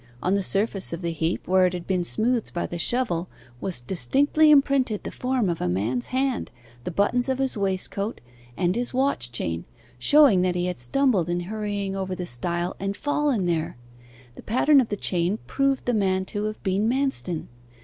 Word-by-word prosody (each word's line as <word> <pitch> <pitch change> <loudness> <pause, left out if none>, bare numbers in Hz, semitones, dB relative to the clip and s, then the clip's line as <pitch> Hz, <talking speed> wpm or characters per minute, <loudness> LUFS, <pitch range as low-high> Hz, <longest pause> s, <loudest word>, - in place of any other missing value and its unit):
On 185 - +2
the 200 - +2
surface 195 -1 -1
of 170 +2 -5
the 170 - -1
heap, 165 +1 -2
where 185 0 +4
it 180 - -3
had 175 -1 -5
been 185 -2 0
smoothed 230 +5 -1
by 175 - -1
the 175 - -5
shovel, 185 -5 0 0.3
was 180 -2 -2
distinctly 280 - +2
imprinted 275 -6 +3
the - - -5
form 255 -4 -1
of 170 -2 -2
a 90 - 0
man's 110 +7 -1
hand, 260 0 -1 0.4
the - - -2
buttons 220 +8 +1
of 260 - 0
his 265 -1 -1
waistcoat, 200 +1 -2 0.4
and 180 0 +1
his 245 +1 -2
watch 260 - 0
chain, 85 -8 -2 0.4
showing 275 - +6
that 180 -1 +1
he 175 0 0
had 180 -5 -3
stumbled 195 - +1
in 175 0 0
hurrying 205 0 -3
over 190 -1 -3
the 180 - -4
stile, 170 +6 -1
and 195 +1 -3
fallen 290 -8 0
there. 165 -6 -1 0.6
The - - -12
pattern 270 +5 +4
of 240 - -3
the 205 - -2
chain 180 +2 +1
proved 275 -1 0
the 245 - +1
man 190 -3 +1
to 205 +2 -3
have 215 0 -5
been 195 +3 +1
Manston. 260 - -1
195 Hz, 190 wpm, -25 LUFS, 175-250 Hz, 0.6 s, showing